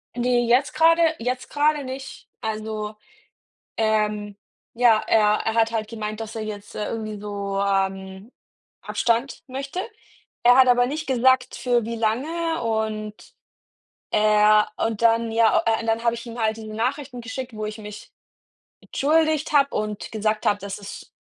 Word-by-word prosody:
Ne, 245 0 +1
jetzt 245 +4 +2
gerade, 330 +1 +4 0.2
jetzt 250 +2 -3
gerade 295 0 +1
nicht. 265 +1 -8
Also, 215 -1 -4 0.8
ähm, 210 -2 0 0.4
ja, 235 -2 +4
er 225 - +4 0.2
er 225 - 0
hat 225 0 +2
halt 220 -2 -2
gemeint, 215 -1 -5
dass 225 0 -7
er 220 - -3
jetzt, 205 -1 -8
äh, 210 - -3
irgendwie 215 -2 -4
so, 200 -1 -4
ähm, 195 +1 -2 0.5
Abstand 235 +3 -1
möchte. 275 +5 -5 0.6
Er 245 +1 +7
hat 260 -1 +7
aber 245 0 +4
nicht 305 +4 -4
gesagt, 260 0 +3
für 240 -3 +1
wie 230 +1 -4
lange 300 +9 -1
und 220 -1 -3 0.8
er 210 0 +4
und 225 -1 -2
dann 230 0 +3
ja, 225 0 +3
äh, 225 -1 +2
und 230 - -6
dann 225 0 0
habe 235 -1 +2
ich 235 +1 -8
ihm 235 0 -7
halt 220 0 +1
diese 215 -1 -8
Nachrichten 255 +3 -3
geschickt, 250 +1 -6
wo 215 0 -4
ich 215 +1 -6
mich 210 -1 -10 0.7
entschuldigt 310 +1 +1
habe 280 -2 +5
und 210 -1 -3
gesagt 215 0 -1
habe, 205 - +3
dass 200 0 -6
es 200 -1 -10
225 Hz, 160 wpm, -23 LUFS, 215-250 Hz, 0.8 s, Er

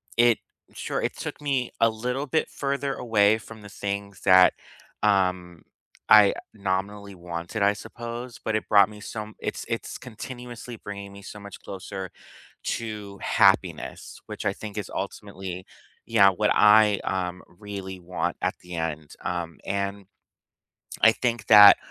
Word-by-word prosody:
it 120 -1 +5 0.4
sure - - -3
it - - -2
took - - -6
me 135 -4 -1
a 115 - +5
little 125 +6 -3
bit 155 +4 0
further 140 0 -2
away 110 -3 +3
from 110 0 -12
the 100 - -10
things 100 0 -5
that, 95 -1 +7 0.5
um, 90 -4 +1 0.4
I 105 -2 +8 0.2
nominally 100 0 -3
wanted, 85 +4 -4
I 100 +1 +4
suppose, 120 +3 -8
but 110 - -1
it 110 - -3
brought 100 -2 +6
me 105 -1 -12
some 110 0 -6
it's - - -4
it's - - -4
continuously 120 0 -8
bringing 100 -1 -8
me 100 0 -12
so 105 - -9
much 100 -1 -10
closer 95 -1 -7 0.5
to 105 -3 -4
happiness, - - +1
which - - -7
I - - +1
think 105 -1 -9
is 105 -4 -4
ultimately 95 -1 -6 0.4
yeah, 105 -4 +6
what 105 +2 +1
I, 105 -1 +6
um, 90 -1 -2
really 95 -1 -8
want 90 +1 -3
at - - +1
the 90 0 -9
end. 80 -2 -4
Um, 85 -2 -3
and 100 0 -3 1.0
I 115 - +7
think 120 -2 -2
that, 105 -2 +10
100 Hz, 150 wpm, -25 LUFS, 95-110 Hz, 1.0 s, that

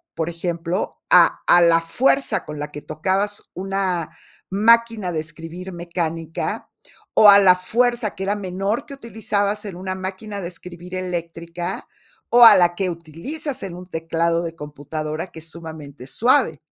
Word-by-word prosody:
por 160 0 -2
ejemplo, 170 +2 -3
a - - +5
a 175 - +7
la 170 -1 +5
fuerza 265 +11 +1
con 150 -1 -7
la 150 0 -5
que 150 - -8
tocabas 190 +6 -2
una 185 -3 -2 0.4
máquina 225 -1 +3
de 155 - -1
escribir 165 +4 -9
mecánica, 165 -2 -4 0.4
o 210 - +8
a 200 0 +9
la 185 -2 +6
fuerza, 240 +3 0
que 190 - -5
era 200 +2 0
menor, 195 +2 -2
que 280 - -9
utilizabas 210 -4 -2
en 195 - -6
una 185 +1 -4
máquina 195 +2 -6
de 170 - -4
escribir 180 0 -11
eléctrica, 170 -1 -5 0.4
o 240 0 +7
a 225 -3 +11
la 175 -2 +3
que 190 0 -1
utilizas 255 - -6
en 185 -3 -6
un 180 0 -10
teclado 165 0 -1
de 165 -1 -5
computadora 155 +2 -5
que 165 - -12
es 160 0 -9
sumamente 155 -5 -10
suave 235 - +2
180 Hz, 160 wpm, -21 LUFS, 165-200 Hz, 0.4 s, a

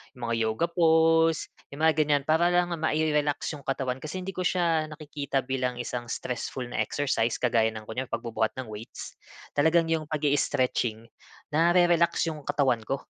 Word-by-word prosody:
yung 120 -2 -5
mga - - +2
yoga 110 +9 0
pose, 165 -1 +3 0.2
'yung 140 - -9
mga 160 0 +5
ganyan, 145 -2 +2
para 160 +2 +4
lang 175 0 +2
mai-relax 150 -2 0
yung - - -10
katawan. 130 -1 -2
Kasi 155 +5 -5
hindi 190 - -4
ko - - -5
siya 170 -3 +1
nakikita 145 -3 -3
bilang 130 -1 -1
isang 120 0 -4
stressful 125 +1 -4
na 120 - -5
exercise, 120 -5 0
kagaya 115 -2 +3
ng 110 - -7
kunyari 125 +4 -4
pagbubuhat 115 -2 -1
ng 130 - -5
weights, 105 +2 -9 0.4
talagang 160 +3 +4
yung 160 -1 +1
pag-i-stretching, 130 -6 0 0.5
nare-relax 170 +1 +3
yung 155 - -7
katawan 135 -5 +2
ko. 135 - -1
145 Hz, 160 wpm, -27 LUFS, 125-160 Hz, 0.5 s, mga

